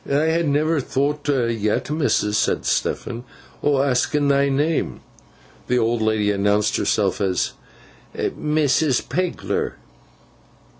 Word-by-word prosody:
'I - - -1 0.2
ha 165 +1 +1
never 155 +1 +1
thowt 145 +3 -1 0.3
yet, 105 +6 -1
missus,' 140 -9 +1
said - - 0
Stephen, 120 +1 -1 0.4
'o' 145 -1 +2
askin 140 +2 +1
thy 140 0 +3
name.' 150 +4 0 0.7
The 125 - +2
old 115 -1 +1
lady 110 -1 +1
announced 105 +1 +1
herself 100 -2 0
as 95 -2 0 0.7
'Mrs. 150 -2 +1
Pegler. 180 +6 -2
135 Hz, 110 wpm, -22 LUFS, 110-150 Hz, 0.7 s, thy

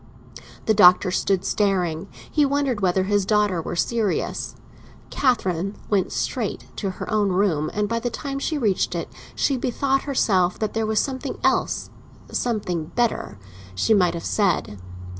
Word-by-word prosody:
The 220 - +3
Doctor 185 -2 +6
stood 190 0 0
staring; 185 -4 0 0.2
he 300 - +3
wondered 280 -5 0
whether 185 0 +2
his 205 +1 +1
daughter 205 -3 +2
were - - -5
serious. 215 +4 -1 0.6
Catherine 195 -7 0 0.2
went 195 -3 +1
straight - - -2
to 200 - -2
her - - -5
own 210 -2 +2
room, 180 -5 +1
and 210 0 -1
by 230 +2 -1
the 245 - -2
time 275 +3 -4
she 310 +2 -1
reached 210 -9 0
it - - -3 0.3
she 275 - +1
bethought 270 +2 0
herself 190 -10 +2
that 215 -2 -2
there 225 -1 -1
was 220 -1 +2
something 265 -2 -3
else—something 200 -9 -2
better—she 95 - -1
might 180 -4 +3
have 170 - -6
said. 180 - 0
205 Hz, 145 wpm, -23 LUFS, 180-235 Hz, 0.6 s, Doctor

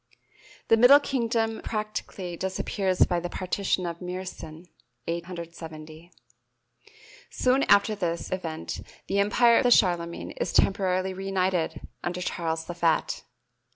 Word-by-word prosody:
The 225 - +6
Middle 250 +5 +8
Kingdom 230 -5 -1
practically 210 -4 -4
disappears 190 +1 0
by 175 - 0
the 175 +1 -4
Partition 185 0 -1
of 170 -1 -4
Meersen 180 -2 -7 0.4
(870). 170 -1 -7 1.2
Soon 255 +2 +2
after 200 +2 +5
this 170 -5 -3
event 165 -4 -4 0.2
the 200 - 0
empire 230 +3 +5
of 245 - +3
Charlemagne 175 -6 +2
is - - -1
temporarily 190 -1 +2
reunited 185 -4 -1 0.2
under 175 +1 -3
Charles 165 -2 -2
the 175 - -5
Fat. 170 -2 0
185 Hz, 115 wpm, -27 LUFS, 170-205 Hz, 1.2 s, Middle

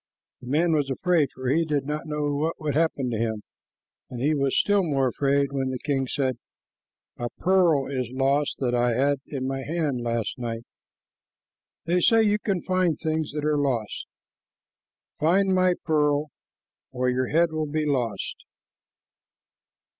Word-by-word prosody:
The 125 - -11
man 160 +6 +2
was 145 -3 +1
afraid, 160 +1 +2
for 130 0 -6
he 160 +5 +3
did 150 -4 -1
not 150 +3 -4
know 150 -1 -1
what 155 +3 -1
would 150 -2 -2
happen 145 -4 0
to 110 - -2
him, 110 -2 -2 0.7
and 125 - -7
he 145 +5 +2
was 140 -2 +1
still 205 -1 +3
more 140 -7 +1
afraid 140 +1 +1
when 135 -1 -1
the 130 - -2
king 135 0 -1
said, 130 -2 -1 0.8
"A 120 0 -2
pearl 175 -6 +3
is 130 -3 -3
lost 135 +2 +1
that 125 -2 0
I 120 0 +2
had 140 +2 +2
in 135 -3 -4
my 135 0 -2
hand 150 -4 -2
last 115 0 -2
night. 115 -1 -4 1.2
They 175 +2 +2
say 225 +4 +5
you 210 0 +2
can 195 -4 -1
find 185 -4 +1
things 160 -1 -2
that 150 -1 -3
are 150 -1 +2
lost. 120 -7 -2 1.1
Find 190 +5 +3
my 185 -1 +3
pearl, 150 -1 +1 0.6
or 125 0 -1
your 125 0 +1
head 165 +2 +2
will 155 -2 -3
he 155 0 0
lost." 120 -9 -2
145 Hz, 160 wpm, -25 LUFS, 130-160 Hz, 1.2 s, say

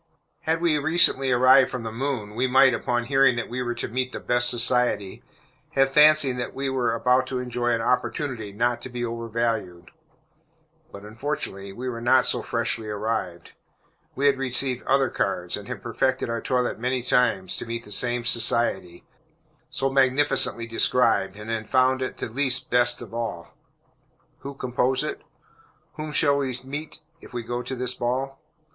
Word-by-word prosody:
Had 160 +1 -1
we 160 -3 +2
recently 145 -3 +3
arrived 130 +2 +6
from 125 -3 -5
the 110 - -5
moon, 115 -3 -3
we 125 +4 0
might, 130 0 +5
upon 120 +1 -1
hearing 135 0 +3
that 120 - -4
we 125 +1 -3
were 120 -1 -2
to - - -4
meet 130 +2 -2
the - - -5
"best 120 0 +2
society," 120 -5 0 0.5
have 135 0 +3
fancied 150 -3 +5
that 125 - -5
we 135 0 -2
were 125 -3 0
about 125 +2 +2
to 130 - -3
enjoy 125 -1 -3
an 115 -1 +1
opportunity 125 -2 -1
not 120 +3 0
to - - -8
be 120 -1 -4
overvalued. 115 -6 -3 1.0
But 100 - -11
unfortunately 105 -4 -5
we 125 +6 -6
were 115 -2 -4
not 125 +2 +4
so - - 0
freshly 115 -2 -2
arrived. 105 -5 -3 0.6
We 140 - -1
had 140 -2 +3
received 130 -1 -1
other 135 0 +3
cards, 90 -2 -2
and 105 0 -9
had - - -7
perfected 130 +1 -1
our 115 - -2
toilette 125 -3 -1
many 125 +1 -1
times, 115 -7 +1
to - - -5
meet 115 0 -5
this 105 - -2
same 120 -1 -1
society, 115 -7 0 0.6
so 135 - -1
magnificently 135 -3 +2
described, 115 -4 +2
and 105 +2 -7
had 110 -2 -4
found 130 0 +3
it 130 - -4
the - - -4
least 130 +2 0
"best" 120 0 +2
of 115 - -13
all. 115 -8 -5 0.8
Who 140 0 -8
compose 130 0 0
it? 400 +1 -5 0.7
Whom 155 -1 -6
shall 145 -1 +3
we 130 -3 -2
meet 145 +4 -7 0.2
if - - -14
we 120 -1 -4
go 120 +1 -3
to 130 - -5
this 125 0 -2
ball? 130 +4 -3
125 Hz, 175 wpm, -24 LUFS, 115-130 Hz, 1.0 s, arrived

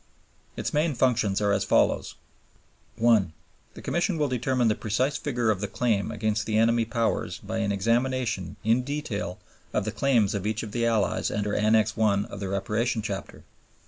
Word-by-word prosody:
Its - - -3
main 150 0 +1
functions 115 -5 +2
are 100 -1 +2
as 100 - +1
follows: - - +2 0.8
1. 110 -7 +3 0.4
The - - -10
Commission 175 +1 0
will 150 -1 +1
determine 125 -1 +1
the 110 - +4
precise 120 +6 -1
figure 120 -7 0
of 100 -2 -2
the 105 - -1
claim 105 -2 0
against 105 0 -1
the 110 -1 +1
enemy 115 +1 +3
Powers 115 -6 -1
by 110 +3 -4
an 100 -2 0
examination 115 -1 0
in 115 +4 +3
detail 125 - -4 0.4
of 105 - 0
the 110 - -2
claims 115 -4 +2
of 100 0 -2
each 110 0 -2
of 110 - -7
the 115 0 0
Allies 110 -3 +1
under 105 0 -2
Annex 110 0 +3
I. 105 -3 +2
of - - -7
the 100 -2 -4
Reparation 105 +4 -1
Chapter. 100 -3 -6
110 Hz, 175 wpm, -26 LUFS, 105-120 Hz, 0.8 s, the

